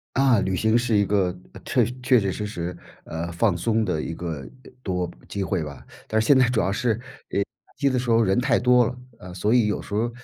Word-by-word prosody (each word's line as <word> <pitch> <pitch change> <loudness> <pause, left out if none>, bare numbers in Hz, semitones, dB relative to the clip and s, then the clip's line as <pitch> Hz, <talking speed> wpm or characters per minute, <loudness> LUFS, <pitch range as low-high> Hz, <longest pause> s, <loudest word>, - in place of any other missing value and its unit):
啊， 130 -5 +4
旅 95 -1 0
行 110 +3 +3
是 120 -2 +1
一 100 - +3
个 95 -3 +1 0.3
确 - - +2 0.2
确 125 0 +4
确 95 -1 0
实 105 +3 -4
实， 90 -3 -5 0.3
呃， 80 +1 -5
放 90 +1 +2
松 110 +5 +1
的 90 -7 -1
一 80 - -4
个 80 -8 -5 0.3
多 90 -5 -2 0.2
机 100 - -3
会 95 -2 -1
吧， 75 -3 -8 0.2
但 110 - +1
是 110 - +1
现 140 +3 +6
在 125 - +5
主 120 -2 +1
要 95 - 0
是 115 +1 +1
假 120 -5 -4 0.3
期 140 - +2
的 130 -1 0
时 125 -1 -3
候 115 0 +5
人 95 +1 +2
太 130 +2 +2
多 125 -1 +4
了， 125 - -3 0.2
啊， 90 -1 -10
所 105 +5 +1
以 120 -4 +4
有 105 - -1
时 - - -9
候 110 +3 +1
105 Hz, 250 characters per minute, -24 LUFS, 90-120 Hz, 0.3 s, 现